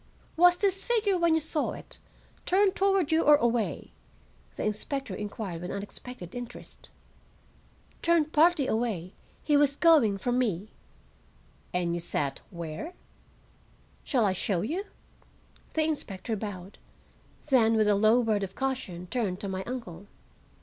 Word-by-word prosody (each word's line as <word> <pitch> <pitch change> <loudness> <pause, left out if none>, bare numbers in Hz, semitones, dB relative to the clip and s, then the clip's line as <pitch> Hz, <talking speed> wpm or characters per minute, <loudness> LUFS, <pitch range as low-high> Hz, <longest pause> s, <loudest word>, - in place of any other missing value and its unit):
"Was 355 +1 +6
this 390 -1 0
figure, 435 -5 +1
when 340 -2 +3
you - - +3
saw 310 -1 -1
it, - - -10 0.5
turned 385 +1 +3
toward 390 -5 +2
you 320 +1 +4
or 295 -2 +7
away?" 235 -4 -1 0.6
the - - -4
inspector 270 +6 -3
inquired 205 -5 -5
with 180 - -5
unexpected 200 -1 -7
interest. 245 0 -9 1.1
"Turned 330 -2 +2
partly 315 -2 +4
away. 220 -7 -2 0.3
He 295 - +2
was 285 -1 +4
going 290 - +5
from 245 +5 0
me." 210 -4 -1 1.0
"And 175 -1 0
you 175 - -2
sat—where?" 165 - -4 1.1
"Shall 250 -7 +2
I 190 - +2
show 185 -1 0
you?" 340 - -3 0.9
The 315 - +3
inspector 230 -8 -3
bowed, 195 -2 -7 0.7
then 225 -4 +5
with 215 -1 +3
a 210 - +5
low 215 +4 +4
word 215 -3 +1
of 195 -1 -5
caution 250 -10 -3
turned 195 -3 -2
to 200 - -4
my 190 -1 -3
uncle. 205 -7 -7
235 Hz, 135 wpm, -28 LUFS, 195-310 Hz, 1.1 s, or